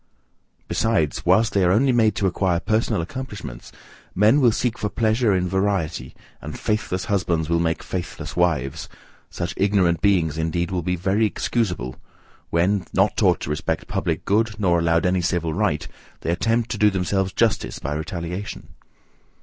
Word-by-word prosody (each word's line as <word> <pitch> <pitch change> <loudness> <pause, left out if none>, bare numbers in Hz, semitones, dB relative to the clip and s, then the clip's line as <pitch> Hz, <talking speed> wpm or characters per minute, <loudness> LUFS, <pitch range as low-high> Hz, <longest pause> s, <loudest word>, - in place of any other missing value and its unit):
Besides, 95 -10 0
whilst 115 +1 +4
they 100 - +3
are 90 - +4
only 130 +7 +4
made 115 -3 +3
to 100 - -1
acquire 90 -1 +1
personal 110 -2 0
accomplishments, 105 - -7 0.4
men 110 +9 +4
will 120 -3 +5
seek 115 +1 -1
for 105 - -1
pleasure 110 +2 +1
in 90 0 0
variety, 90 -8 -1 0.3
and - - -7
faithless 105 -4 -2
husbands 85 -5 0
will 85 - +3
make 85 0 -1
faithless 85 -3 -5
wives; 80 -7 0 0.4
such 85 -1 -4
ignorant 95 -4 +2
beings, 85 -6 +2
indeed, 85 +2 -1
will 90 -1 -1
be 90 +2 -1
very 95 +5 +1
excusable 90 - -2 0.5
when, 90 +2 +1
not - - +2
taught - - +3
to 75 - -3
respect 80 +1 -2
public - - -2
good, 110 +1 +1
nor 90 -4 +3
allowed 85 0 +2
any 90 0 +2
civil 85 -2 -1
right, 80 -5 0 0.3
they 85 - -1
attempt 115 +6 0
to 110 - -3
do 105 - +6
themselves 95 0 0
justice 110 0 0
by 70 - -4
retaliation. 85 +5 -5
95 Hz, 160 wpm, -23 LUFS, 85-105 Hz, 0.5 s, do